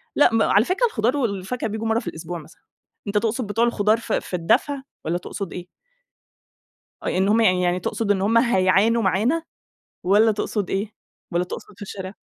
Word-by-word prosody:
لأ، 265 - +5
م 225 - +3
على 210 +3 +4
فكرة 385 +7 +1
الخضار 250 - 0
والفاكهة 220 -1 -2
بييجوا 220 +1 -3
مرّة 225 +1 +2
في - - -10
الأسبوع 170 +1 -5
مثلًا، 160 - -16 0.5
أنت 200 - 0
تقصد 225 +2 0
بتوع 225 +3 +2
الخضار 215 -2 +2
في 230 -1 -2
في - - -5
الدفع 265 - +1 0.2
والّا 165 +2 0
تقصد 190 +1 -6
إيه؟ 180 0 -7 1.4
أ - - -4
إن 190 +1 +2
همّ 225 +2 +4
يعني 185 -5 +3
يعني 180 0 +1
تقصد 205 +4 -1
إن 190 -2 +1
همّ 225 +4 +3
هيعانوا 225 0 +3
معانا 230 - +1 0.6
والّا 210 +4 +4
تقصد 205 -1 -2
إيه، 200 +2 -2 0.4
والّا 175 +1 +1
تقصد 190 - -8
في - - -12
الشارع؟ 190 0 -7
210 Hz, 185 wpm, -23 LUFS, 185-230 Hz, 1.4 s, لأ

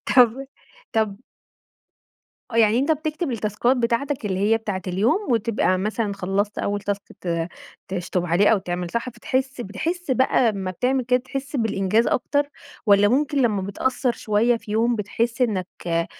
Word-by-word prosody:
طَب 250 +2 +5 0.5
طَب 215 -3 +1 1.3
آه، 230 - -4
يعني 225 +1 +5
أنت 290 +4 +3
بتكتب 310 0 -2
التاسكات 230 +3 +1
بتاعتك 240 +1 -1
اللي 190 -1 -1
هي 215 +3 +3
بتاعة 205 -4 -4
اليوم 215 - +1
وتبقى 215 -4 +1
مثلًا 210 +1 -1
خلصت 200 +2 -1
أول 205 0 -1
تاسك 200 0 -2 0.2
ت 170 -1 -2 0.4
تشطب 180 -1 -2
عليه 175 +5 +4
أو 220 - +4
تعمل 175 -2 -4
صح، 235 +2 -2
فتحس 265 +1 -2
بتحس 305 - -3
بَقى 260 +1 +2
أما 195 -3 -2
بتعمل 255 +6 0
كده، 250 +1 +2
تحس 275 +2 -5
بالإنجاز 220 -1 +1
أكتر 285 +3 +1 0.4
والّا 205 0 +6
ممكن 285 +3 +1
لمّا 210 -5 +1
بتقصر 245 +5 0
شوية 225 +3 +1
في 215 - -11
يوم 230 +2 +2
بتحس 230 +4 -1
إنك 195 -7 0 0.2
آآ، 165 0 +1
225 Hz, 155 wpm, -23 LUFS, 200-255 Hz, 1.3 s, والّا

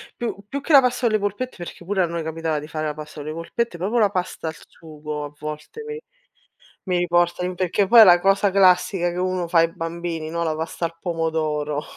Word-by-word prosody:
più 240 - -3
più 280 +5 -4
che 300 - -4
la 275 - +10
pasta 250 -1 0
con 215 - +1
le - - +2
polpette, 205 +6 -3
perché 175 0 -9
pure 195 +1 0
a - - +2
noi 170 0 -4
capitava 160 -1 -2
di 150 - -9
fare 155 0 -4
la 150 - -2
pasta 150 0 -10
con - - -9
le - - -4
polpette, 175 +5 -3
proprio 195 +7 -1
la 210 -2 +4
pasta 180 -3 -3
al 160 - -7
sugo 150 -2 -8
a 145 - -10
volte 150 - -7
mi 450 0 -5 0.9
mi 180 -2 0
riporta 175 0 +1
in 180 - -3
perché 185 +2 +1
poi 235 +4 +7
è - - +12
la 175 -3 +7
cosa 195 +2 +3
classica 185 -1 +3
che 175 - -6
uno 185 -1 -1
fa 170 0 +3
ai 165 0 +3
bambini, 165 -1 -4
no, 170 0 -1
la 160 -2 -1
pasta 160 +2 -3
al 165 0 -6
pomodoro. 155 -3 -2
175 Hz, 235 wpm, -22 LUFS, 160-195 Hz, 0.9 s, è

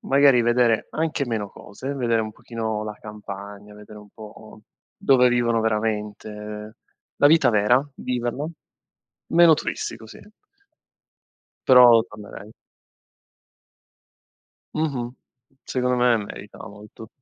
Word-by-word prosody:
magari 135 -3 +4
vedere 120 -2 +2
anche 155 -3 -2
meno 110 -4 -3
cose, 130 +10 -8
vedere 115 -4 0
un 110 0 -6
pochino 110 -2 -4
la 105 0 -6
campagna, 105 -1 -10
vedere 105 0 -13
un 105 - -16
po' 110 0 -13 0.4
dove 125 -2 +4
vivono 120 -2 +1
veramente, 110 -1 -2
ehm, 105 0 -8 0.5
la - - +6
vita 160 -3 +5
vera, 115 +5 +3
viverlo, 125 +5 -3 0.8
meno 170 -2 +6
tristico, 110 -6 -5
sì. - - -12 1.5
Però 125 -3 +8
tornerei. 105 0 -11 2.2
Mh-mh. 135 -6 -2 0.5
Secondo 125 -1 -1
me 120 -1 +3
merita 105 0 -9
molto. 105 +1 -12
115 Hz, 110 wpm, -23 LUFS, 105-125 Hz, 2.2 s, Però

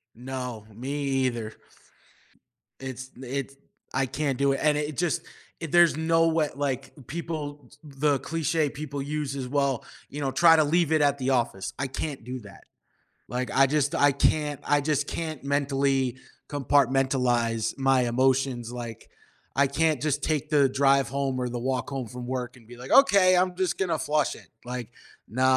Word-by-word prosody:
No, 125 -3 -6
me 125 +5 -6 0.3
either. 115 -3 -3 1.3
It's 130 -1 -6
d 130 +1 -11
it's 135 +1 -4 0.4
I 135 0 +1
can't 135 0 -2
do 140 0 +3
it, 135 - -2
and 150 -1 +3
it 150 -1 -3
just 175 -2 0 0.4
i 165 - -2
there's 170 0 +4
no 165 +1 +3
way 160 -2 +1
like, 140 -3 -2 0.2
people 150 -3 -5
t - - -19
the 145 -1 0
cliché 160 -1 -1
people 145 -1 -5
use 145 -1 -3
is, 130 -2 -4
"Well, 140 -2 0 0.3
you 145 +1 -6
know, 135 -1 0
try 165 +1 +6
to 155 - +5
leave 165 +1 +2
it 155 -1 +3
at 145 -1 +3
the 135 0 -1
office." 120 -6 -1
I 135 - -1
can't 135 0 -5
do 125 +2 -5
that. 100 -2 -14 0.6
Like, 125 +2 -3
I 135 +1 +5
just 145 0 +1
I 145 0 +5
can't 145 +1 +1
I 145 -1 +2
just 145 0 0
can't 155 -5 -4
mentally 135 -2 +1 0.3
compartmentalize 130 -5 +1
my 135 -1 +3
emotions. 130 -1 +1
Like, 120 -2 -7 0.5
I 140 0 +4
can't 155 0 +1
just 150 -1 -1
take 155 -3 -1
the 145 -2 +4
drive 135 0 +3
home 135 -1 -1
or 125 - -1
the 120 0 -4
walk 130 +2 -2
home 135 -4 -4
from 125 +3 -8
work 125 -1 -4
and 115 -3 -19
be 120 - -11
like, 125 +1 -8
"Okay! 200 -9 +6
I'm 180 0 +2
just 185 -2 -1
gonna 170 -5 0
flush 150 -1 0
it." - - -15 0.2
Like, 125 -2 -5 0.4
no, 130 +4 -1
140 Hz, 180 wpm, -26 LUFS, 130-150 Hz, 1.3 s, try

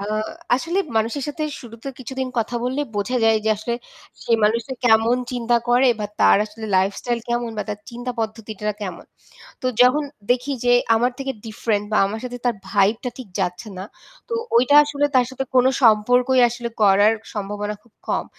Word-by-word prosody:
আ 200 - -4 0.5
আসলে 335 +8 -1 0.2
মানুষের 230 +6 0
সাথে 300 +2 -4 0.2
শুরুতে 230 +2 -9
কিছুদিন 260 +1 -4
কথা 230 +2 -2
বললেই 275 +3 -1
বোঝা 205 +5 -1
যায় 225 0 +5
যে - - +1
আসলে 225 +3 -3 0.5
সেই 230 - +3
মানুষটা 230 +4 0
কেমন 225 +1 +4 0.2
চিন্তা 240 -1 +1
করে 250 +2 +5
বা 210 - -1
তার - - +6
আসলে 220 +1 -9
লাইফস্টাইল 200 +5 0
কেমন 240 0 -1
বা - - 0
তার 210 -1 -4
চিন্তা 245 +1 -5
পদ্ধতিটা 215 -1 -4
কেমন? 185 -4 -6 0.6
তো - - -1 0.2
যখন 270 +4 +4 0.3
দেখি 250 +3 +1
যে 245 - +4 0.2
আমার 245 +3 +1
থেকে 270 0 -3
ডিফারেন্ট 215 -1 -1
বা 215 - +3
আমার 215 +3 -5
সাথে 245 0 -5
তার 240 - +2
ভাইবটা 210 +5 +1
ঠিক 255 -5 -9
যাচ্ছে 180 +4 -3
না। 185 - -5 0.4
তো - - -7 0.2
ওইটা 255 +4 +4
আসলে 290 0 0
তার 250 -1 +4
সাথে 260 +1 -4
কোনো 255 0 +5
সম্পর্কই 245 +3 +4
আসলে 240 0 -5
করার 205 +2 +5 0.2
সম্ভাবনা 205 0 -3
খুব 235 - -27 0.2
কম। - - 0
235 Hz, 175 wpm, -21 LUFS, 210-250 Hz, 0.6 s, তার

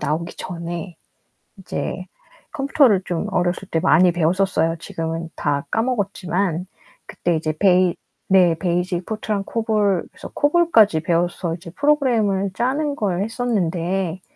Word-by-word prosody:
나오기 165 +3 -3
전에 170 0 -6 0.6
이제 - - -5 0.5
컴퓨터를 275 -8 +3
좀 175 -2 -2
어렸을 180 +2 -1
때 165 - 0
많이 180 +2 +5
배웠었어요. 170 -1 +1
지금은 165 0 -4
다 145 -2 -1
까먹었지만 195 -6 -1 0.4
그때 175 -1 -1
이제 155 -1 -1
베이 185 -1 +4 0.3
네. 180 -3 +5
베이직 175 +1 -1
포트랑 215 -2 -3
코볼, 210 -4 0
그래서 - - -10
코볼까지 290 - +4
배워서 170 +1 0
이제 170 0 -11
프로그램을 225 - +1
짜는 280 +7 -1
걸 195 -6 -1
했었는데 190 -6 -1
185 Hz, 295 characters per minute, -21 LUFS, 170-215 Hz, 0.6 s, 많이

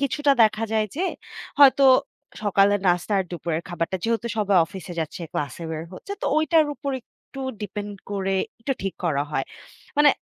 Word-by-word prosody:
কিছুটা 280 +1 +2
দেখা 215 +1 +3
যায় 215 -1 +2
যে 360 - 0 0.5
হয়তো 280 -1 +7 0.6
সকালের 205 0 +3
নাস্তা 175 +3 +2
আর 190 - +1
দুপুরের 170 -1 -3
খাবারটা 175 +2 -2
যেহেতু 230 0 0
সবাই 200 -2 +2
অফিসে 190 -1 -8
যাচ্ছে 160 +2 -5
ক্লাসে 145 +3 -4
বের 160 0 -4
হচ্ছে। 400 - -8
তো - - 0
ঐটার 310 0 +4
উপর 280 -1 -4
একটু 270 +3 -14 0.2
ডিপেন্ড 205 0 -5 0.2
করে 195 -1 -1 0.3
একটু 270 +4 -1
ঠিক 195 -1 -2
করা 145 -4 +1
হয়। 135 -3 -1 0.5
মানে 295 -1 +7
205 Hz, 165 wpm, -24 LUFS, 175-270 Hz, 0.6 s, হয়তো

